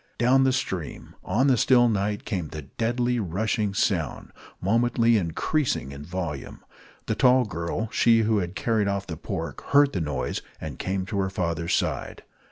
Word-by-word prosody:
Down 130 +2 +4
the 130 - +4
stream, 95 - -4
on 125 +5 +1
the 130 -3 +4
still 120 +1 +5
night, 105 -1 -1
came 95 -7 -2
the 75 0 -7
deadly, 120 - -1
rushing 105 +2 -1
sound, 85 -8 -1 0.3
momently 115 +3 +2
increasing 95 - 0
in 70 +1 -8
volume. 85 -4 -5 0.4
The - - 0
tall 125 0 +4
girl, 85 +4 -3
she 115 -1 +4
who 110 -1 +2
had 90 0 -4
carried 110 +2 +1
off 100 0 -1
the 80 - -5
pork, - - -5
heard 140 0 +4
the 90 - -1
noise, 75 -5 -2 0.2
and - - -7
came 95 0 -2
to 100 0 -3
her 95 -1 0
father's 85 -3 -1
side. - - -2
100 Hz, 170 wpm, -25 LUFS, 85-120 Hz, 0.4 s, still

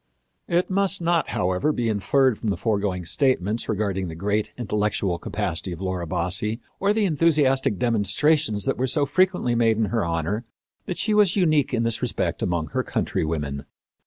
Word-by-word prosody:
It 175 +2 0
must 195 +1 +2
not, 170 -1 +1
however, 90 +11 0
be 120 -5 -1
inferred 115 +4 +2
from 110 - -2
the 100 - -1
foregoing 100 -5 -1
statements 110 - 0
regarding 100 -3 -1
the 80 - -7
great 105 +4 -1
intellectual 105 -5 -1
capacity 85 +2 -3
of 85 - -9
Laura 95 -2 -3
Bassi 95 +8 -1 0.2
or 200 +1 +2
the 215 0 +1
enthusiastic 145 - +2
demonstrations 115 - +1
that - - -1
were 130 - +1
so 145 +3 +2
frequently 180 -5 +1
made 115 -2 +2
in 110 - +2
her 115 - +1
honor 85 +6 -2 0.4
that 180 - -3
she 215 - 0
was 210 -4 +4
unique 155 -8 +2
in 115 -3 0
this 115 -1 0
respect 100 -8 -1
among 85 -3 -1
her - - -1
countrywomen. 75 -3 -2
110 Hz, 170 wpm, -24 LUFS, 95-150 Hz, 0.4 s, was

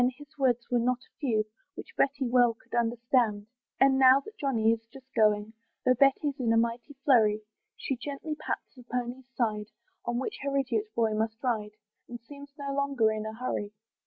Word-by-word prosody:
his 290 +1 -14
words 245 -4 +1
were 245 - +3
not 250 +1 +2
a - - -33
few, 230 -7 +1 0.3
Which - - -10
Betty 275 0 +1
well 240 -1 +4
could - - -23
understand. 235 -2 +1 0.3
And 270 0 +5
now 260 0 +8
that 430 +9 -12
Johnny 235 - +2
is 230 0 -1
just 265 -1 -15
going, 210 0 +3 0.3
Though 255 - +6
Betty's 275 +2 +2
in 235 -3 +1
a 225 - +4
mighty 235 +4 -1
flurry, 215 -6 +4 0.4
She 270 - -3
gently 285 +4 -5
pats 300 - -5
the 255 - -13
pony's 250 +1 -4
side, 210 -4 0 0.4
On 240 0 -1
which 260 - -3
her 280 0 -1
idiot 240 -6 0
boy 225 -2 +2
must 220 +1 -1
ride, 215 -4 -1 0.3
And 240 0 -7
seems 280 +4 -12
no 280 -1 -4
longer 275 -6 +2
in 215 0 -3
a 220 - -5
hurry. 215 -4 -3
245 Hz, 190 wpm, -29 LUFS, 225-275 Hz, 0.4 s, now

